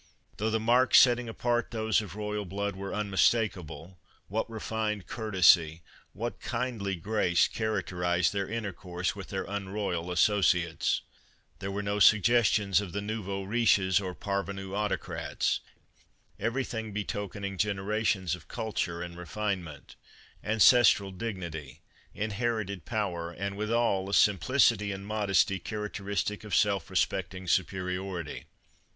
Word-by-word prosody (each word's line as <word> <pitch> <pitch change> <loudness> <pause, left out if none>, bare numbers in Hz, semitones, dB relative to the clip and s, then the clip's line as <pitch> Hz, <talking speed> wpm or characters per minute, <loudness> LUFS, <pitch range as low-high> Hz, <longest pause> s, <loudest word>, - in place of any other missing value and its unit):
Though 110 +2 0
the 110 0 +1
marks 120 +3 +4
setting 120 -2 +4
apart 120 +1 -1
those 110 -1 +1
of 100 -3 -9
royal 105 0 -3
blood 100 +1 -3
were 100 +1 -6
unmistakable, 95 -5 0 0.3
what 110 +4 -2
refined 110 -3 -3
courtesy, 90 -7 +3 0.3
what 120 +2 -4
kindly 115 -5 -2
grace 90 -1 +2
characterized 90 -5 0
their 100 -1 -2
intercourse 95 -5 -3
with 100 -2 -8
their 95 -1 -3
unroyal 100 -3 -3
associates! 90 -3 +2 0.6
There 95 - -4
were 100 +1 -3
no 100 +1 -1
suggestions 105 -3 +4
of 95 -4 -7
the 100 - -2
nouveaux 100 -2 -4
riches 100 -3 +3
or 90 -2 -5
parvenue 100 -1 -4
autocrats, 105 0 -1 0.8
every 115 +6 0
thing 110 -4 -5
betokening 100 -2 -4
generations 100 -3 0
of 90 -2 -7
culture 100 -7 -3
and 85 -1 -8
refine 95 +2 -3
ment, 75 -3 -12 0.5
ancestral 110 -2 +5
dignity, 85 - -6 0.3
inherited 110 -3 -2
power 95 -7 -2
and 100 +3 -4
withal 105 -2 0
a 100 - +1
simplicity 105 - +3
and 95 0 -6
modesty 100 -2 +1
characteristic 105 +1 -3
of 105 -4 -2
self 100 -3 +2
respect - - 0
ing 95 0 -8
superiority. 90 -2 -2
100 Hz, 125 wpm, -29 LUFS, 95-110 Hz, 0.8 s, ancestral